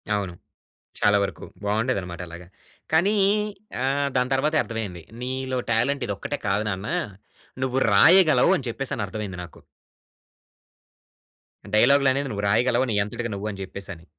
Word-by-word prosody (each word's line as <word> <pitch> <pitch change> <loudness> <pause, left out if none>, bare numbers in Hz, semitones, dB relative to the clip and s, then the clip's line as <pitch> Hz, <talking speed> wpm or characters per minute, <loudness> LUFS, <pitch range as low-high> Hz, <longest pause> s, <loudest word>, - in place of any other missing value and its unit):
అవును. 100 -4 -3 0.7
చాలా 105 0 +4
వరకు 100 - -5 0.2
బావుండేదన్నమాట 100 -5 -1
అలాగా. 85 +1 -10 0.4
కానీ 180 +7 +3 0.7
ఆహ్, 140 +1 +1
దాని 125 +1 +1
తర్వాతే 150 +4 +1
అర్థమైంది. 105 -7 -5 0.2
నీలో 130 +1 -3
టాలెంట్ 125 +4 +1
ఇదొక్కటే 105 +8 -3
కాదు 100 +1 +1
నాన్న, 95 +1 -4 0.8
నువ్వు 130 0 -1 0.2
రాయగలవు 160 - +6
అని 135 -6 -6
చెప్పేసని 120 -2 -3
అర్థమైంది 100 -3 -5
నాకు. 85 - -13 2.1
డైలాగులనేది 135 +4 +4
నువ్వు 100 -1 -3
రాయగలవు 120 +4 +3
నీ - - 0
అంతటికి 115 +2 -5
నువ్వు 100 +2 -4
అని 100 - -9
జెప్పేసని. 95 -3 -8
115 Hz, 125 wpm, -24 LUFS, 100-135 Hz, 2.1 s, రాయగలవు